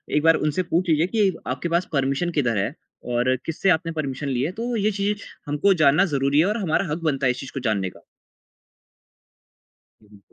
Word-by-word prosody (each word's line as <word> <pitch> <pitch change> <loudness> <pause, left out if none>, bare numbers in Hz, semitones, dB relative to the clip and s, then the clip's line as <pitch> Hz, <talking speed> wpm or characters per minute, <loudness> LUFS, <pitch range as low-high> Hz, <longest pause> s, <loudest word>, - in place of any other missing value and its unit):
एक 150 - +2
बार 165 0 +6
उनसे 150 +4 0
पूछ 175 +1 0
लीजिए 160 +2 +3
कि 210 -2 +2 0.2
आपके 130 +7 -3
पास 170 +2 +1
परमिशन 140 +5 0
किधर 120 -6 +1
है 95 - -1 0.4
और 125 +2 +2
किससे 165 +4 0
आपने 165 -1 +2
परमिशन 145 -3 -4
ली 125 -2 -1
है? 155 - -1
तो 235 +5 -3
ये 215 -1 +1
चीज़ 205 +1 -2 0.2
हमको 150 +7 +3
जानना 155 +2 +4
ज़रूरी 140 +2 +2
है 165 - +5
और 210 +3 0
हमारा 195 -1 0
हक 155 - -1
बनता 135 -1 -1
है - - +4
इस 125 - -6
चीज़ 135 - -8
को 135 - -3
जानने 105 -6 -1
का। - - -17 2.1
जी। 105 -1 -17
155 Hz, 205 wpm, -23 LUFS, 135-185 Hz, 2.1 s, बार